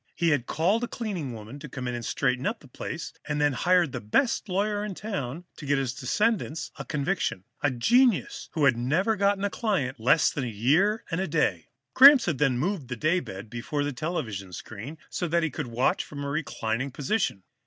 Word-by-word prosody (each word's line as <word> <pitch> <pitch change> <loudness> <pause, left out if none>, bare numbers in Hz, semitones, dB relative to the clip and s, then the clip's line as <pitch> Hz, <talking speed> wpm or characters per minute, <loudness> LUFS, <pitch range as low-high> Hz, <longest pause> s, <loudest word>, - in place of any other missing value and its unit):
He 170 -1 +2
had 145 -6 +1
called 195 +9 +1
a - - 0
cleaning 195 - -4
woman 110 +4 -9
to 150 0 -9
come 130 0 -6 0.2
straighten 125 +2 0
the 215 -10 -3
place 160 +5 -6
up, - - -22
then - - -1
had 145 -1 +3
hired 175 +2 +3
the - - -5
best 215 - +1
lawyer 205 +2 0
in 210 -3 -4
town 170 - -4
to 150 - -8
get 145 0 +3
his 135 -3 -1
descendants 180 - -1
a 135 - -5
conviction, 150 - -1 0.2
a 145 - +3
genius 230 - +2
who 155 -3 +2
had 135 - +5
never 155 - +1
gotten 200 0 +1
a 205 - 0
client 150 - -1
less 125 +8 +4
than 140 - -3
a - - -2
year 150 - +2
and 165 +3 0
a 190 - -1
day. 125 - 0 0.3
Gramps 275 0 +9
had 170 -9 -1
then 135 -4 +2
moved 170 0 -1
the 125 -1 -5
daybed 115 - -1
before 120 +6 -3
the 145 0 -2
television 125 - -4
screen, 115 - -8
so 175 - -2
that 170 +1 +1
he 160 - 0
could 150 -5 -4
watch 120 +2 +1
from 145 -1 -7
a 140 - -3
reclining 135 -4 -2
position. 140 - -1
150 Hz, 205 wpm, -27 LUFS, 125-190 Hz, 0.3 s, Gramps